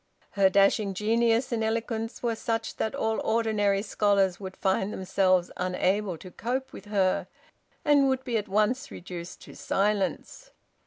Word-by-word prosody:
Her 195 -1 +4
dashing 195 0 +3
genius 230 +4 +2
and 225 -2 0
eloquence 225 +1 -2
were 235 -1 +1
such 225 0 -3
that 220 - -2
all 220 -5 0
ordinary 215 -3 +1
scholars 200 -3 +1
would 190 -2 -8
find 190 +1 0
themselves 185 -2 +1
unable 185 +1 0
to 185 +3 -11
cope 260 +7 -3
with 195 - -10
her, 195 -3 +1 0.6
and 285 -2 +5
would 260 0 0
be 245 -3 -3
at 215 -1 -1
once 215 +7 +1
reduced 175 -1 -8
to - - -12
silence. 200 0 -1
210 Hz, 150 wpm, -27 LUFS, 190-230 Hz, 0.6 s, and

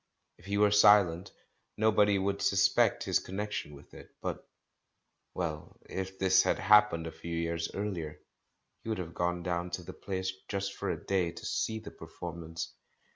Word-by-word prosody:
If 85 - -18
he 100 0 0
were 105 0 +4
silent, 100 -4 +5 0.5
nobody 105 -2 +4
would 100 +1 -1
suspect 100 0 +3
his - - +2
con 95 - -9
nection 105 -7 -3
with 70 - -16
it. - - -12
But - - -5 0.4
— - - -50
well, 80 -4 -4
if 95 0 -5
this 95 0 +5
had - - +1
happened 105 -4 +5
a 80 - -5
few 85 +1 -6
years 85 0 -1
earlier, 90 -7 -4 0.6
he - - -7
would 110 - -1
have 85 -2 -5
gone 85 0 -1
down 90 0 -2
to 90 - -11
the - - -8
place, 95 -1 -3
just 100 -1 -2
for - - -4
a - - -1
day, 95 -3 +1
to 85 - -10
see 110 - -1
the 110 - -9
performance. 85 -2 -7
95 Hz, 180 wpm, -31 LUFS, 85-100 Hz, 0.6 s, silent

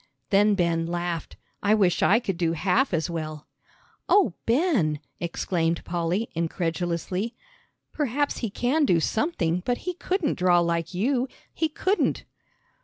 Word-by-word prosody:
Then 205 +1 +5
Ben 170 -3 +1
laughed. 175 -1 -3 0.2
"I 210 +1 +4
wish 190 -5 +2
I 220 +5 +5
could 195 -7 -3
do 165 -2 +1
half 195 - +1
as 160 -3 0
well." 155 -3 -5 0.6
"Oh, 385 - +4
Ben!" 230 - +2 0.2
exclaimed 170 -1 -1
Polly, 175 +6 -1
incredulously. 170 +5 -2 0.6
"Perhaps 290 0 -1
he 230 - -2
can 250 +9 +1
do 175 -11 +4
something, 180 - 0
but 245 +3 -2
he 360 - -1
couldn't 360 - -1
draw 180 -1 +4
like 170 0 -1
you. 250 +6 +1 0.3
He 320 - 0
couldn't." 375 +6 0
180 Hz, 135 wpm, -26 LUFS, 170-245 Hz, 0.6 s, Then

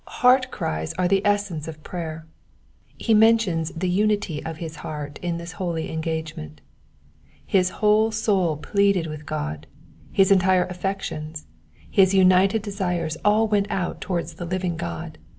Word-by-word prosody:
Heart 255 +1 +3
cries 80 - -3
are 180 -1 0
the 195 +1 +2
essence 200 -7 0
of 155 -1 -9
prayer. 160 -3 -6 0.7
He 225 - +1
mentions 215 -7 +4
the 175 +3 -3
unity 200 -4 0
of 160 0 -5
his 160 -1 -7
heart 150 -2 -6
in 175 -1 -2
this 170 0 -7
holy 170 -3 -3
engagement. 160 - -4 0.9
Bis 185 -2 +4
whole 215 +2 +3
soul 195 -8 +1
pleaded 200 +1 +1
with 155 -2 -7
G^, 75 +1 -3 0.5
his 195 0 +4
entire 185 -1 +4
affections, 180 -4 -4 0.4
his 195 -2 +4
umted 190 +3 +4
desires 180 -6 -2
all 215 +2 +4
went 205 -2 +1
out 185 -4 -2
towards 175 -2 -3
the 175 - -7
living 180 0 -2
God. 85 - -6
180 Hz, 145 wpm, -24 LUFS, 160-200 Hz, 0.9 s, mentions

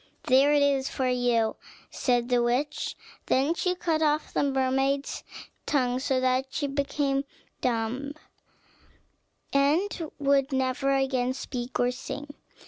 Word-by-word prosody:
"There 270 +3 +5
it 290 -1 +4
is 275 -1 +2
for 260 - -1
you," 245 -3 +1 0.3
said 245 -1 0
the 245 -1 +3
witch. 250 +5 -1 0.3
Then 275 +5 +2
she 360 +1 0
cut 330 -3 0
off 300 0 +1
the - - +1
mermaid's 270 0 0 0.4
tongue, 255 -3 +1
so 265 -1 0
that 255 +1 +1
she 290 - -2
became 280 0 0 0.4
dumb, 250 +4 -1 1.4
and 310 +4 +1
would 280 -1 +2
never 265 +1 0
again 260 -2 +1
speak 250 -1 -5
or 245 0 +3
sing. 290 +3 -7
270 Hz, 130 wpm, -27 LUFS, 255-285 Hz, 1.4 s, There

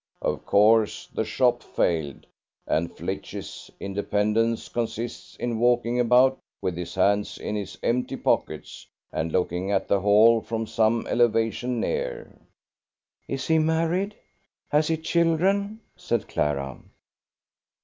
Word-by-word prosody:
Of - - -2
course 110 +1 +4
the - - 0
shop - - +1
failed, 80 -6 -1 0.4
and 85 +2 0
Flitch's - - -6
independence 105 +3 0
consists 120 0 -4
in 120 -2 -3
walking 120 0 +2
about 125 +2 +4 0.2
with 90 - -2
his 85 0 -6
hands 100 +2 +1
in 105 - -4
his 100 -2 -5
empty 125 +2 0
pockets, - - -2 0.2
and 80 0 -2
looking 90 +2 -1
at 100 -1 0
the 100 - +2
Hall 110 +3 +5
from 115 0 -3
some 110 +1 +1
elevation 120 +1 +1
near." 480 - -3 1.0
"Is 135 -1 -3
he 160 0 +3
married? 165 +6 0 0.6
Has 150 +1 +3
he 160 - +1
children?" 185 +7 +1
said 115 -3 -2
Clara. 70 -3 -2
115 Hz, 120 wpm, -25 LUFS, 100-135 Hz, 1.0 s, Hall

